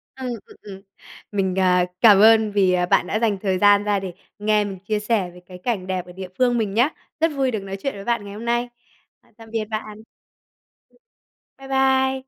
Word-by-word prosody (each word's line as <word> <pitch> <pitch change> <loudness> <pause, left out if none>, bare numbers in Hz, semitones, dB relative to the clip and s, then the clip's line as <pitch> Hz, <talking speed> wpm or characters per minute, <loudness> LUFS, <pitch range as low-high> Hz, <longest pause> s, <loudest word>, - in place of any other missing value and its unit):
Ừm, 260 -1 -6 0.2
ừm, - - -17
ừm. 195 -2 -10 0.5
Mình, 190 -2 -1
à, 180 -1 +3 0.2
cảm 210 -4 +7
ơn 220 0 +6
vì, 190 -3 +2
à, 180 0 +1
bạn - - +2
đã 215 - -1
dành 220 -4 +1
thời 190 -3 0
gian 205 +1 +5
ra 205 -1 +1
để 190 -2 -6 0.3
nghe 210 0 +2
mình 195 -2 -6
chia 210 +2 -2
sẻ 210 -4 0
về 180 - -14
cái 180 0 -11
cảnh 190 -2 -3
đẹp 185 -1 -3
ở 180 - -12
địa 185 +1 -8
phương 245 -1 +2
mình 210 -3 -1
nhá. 245 +6 +3 0.3
Rất 325 0 +2
vui 265 -2 +1
được 215 - -2
nói 195 0 -6
chuyện 275 - -1
với 195 - -8
bạn 235 -2 -1
ngày 200 - -8
hôm 220 +3 -8
nay. 240 +1 0 0.7
Tạm 225 -1 -14
biệt 220 -2 -2
bạn. 215 0 -6 1.5
Bái 270 0 -12
bai. 265 0 +2
210 Hz, 215 wpm, -22 LUFS, 190-235 Hz, 1.5 s, cảm